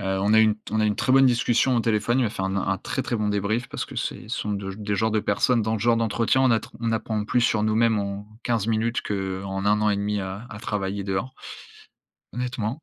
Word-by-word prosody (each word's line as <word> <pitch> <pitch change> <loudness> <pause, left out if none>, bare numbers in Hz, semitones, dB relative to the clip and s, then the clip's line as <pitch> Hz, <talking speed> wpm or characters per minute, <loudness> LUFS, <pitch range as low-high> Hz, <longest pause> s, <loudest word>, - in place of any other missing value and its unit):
Heu, - - -6 0.2
on 105 +2 +2
a 110 - +7
eu - - +6
une 110 -1 +3
t 105 -1 -13
on 110 - +1
a 110 - +3
une 105 -1 0
très 130 - +1
bonne 135 0 +7
discussion 125 +1 +2
au - - +3
téléphone, 115 +3 +1
il - - +3
m'a 110 - 0
fait 95 - -5
un 95 - -1
n - - -2
un 95 0 0
très, 135 - -3
très 120 - -2
bon 105 -1 -1
débrief 105 +4 -1
parce - - -4
que - - -11
c'est - - -3
ce - - -3
sont 105 - -2
de 100 -1 -4
des 105 0 -3
genres 110 +3 +1
de 110 0 +1
personnes 115 +4 +2
dans 110 +1 0
le - - -1
genre 115 +2 +2
d'entretien, 115 +3 +1
on 130 - +4
a 115 - +4
tr - - -12
on 115 -1 0
apprend 110 -1 -1
plus 125 0 +2
sur 110 -2 +2
nous-mêmes 110 0 +2
en 100 +1 -4 0.2
15 115 -3 0
minutes 115 +1 0
qu'en 95 0 -3
1 105 +1 +3
an 105 - +3
et 100 - +1
1/2 100 0 -1
à 95 +5 -6
à 105 - -8
travailler 100 -2 -3
dehors 100 +7 -3 1.0
honnêtement. 125 +2 -3
110 Hz, 275 wpm, -24 LUFS, 100-115 Hz, 1.0 s, a